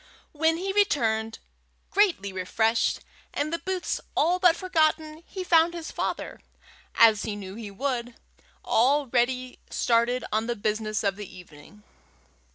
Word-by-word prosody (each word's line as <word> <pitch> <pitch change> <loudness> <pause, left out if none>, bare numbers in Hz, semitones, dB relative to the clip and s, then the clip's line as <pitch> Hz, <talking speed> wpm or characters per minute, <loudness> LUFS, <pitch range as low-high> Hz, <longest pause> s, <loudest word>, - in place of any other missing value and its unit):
When 320 +2 +1
he 385 +2 -3
returned, 225 - +1 0.5
greatly 345 - +2
refreshed, 220 +5 0 0.3
and 305 +3 -1
the 335 - -1
boots 370 +1 -3 0.2
all 350 +4 +3
but 355 -2 +5
forgotten, 315 -3 0
he 375 - -5
found 340 -1 +4
his 330 -2 -6
father, - - -4 0.6
as 220 -2 +6
he 215 - -3
knew 195 -2 -8
he 215 -1 -7
would, 245 +2 -3 0.5
already 255 0 +1
started 235 +1 +1
on 220 +2 0
the 240 - -1
business 215 0 -2
of 200 -1 0
the 210 -3 -9
evening. 180 +4 -15
245 Hz, 135 wpm, -26 LUFS, 215-325 Hz, 0.6 s, as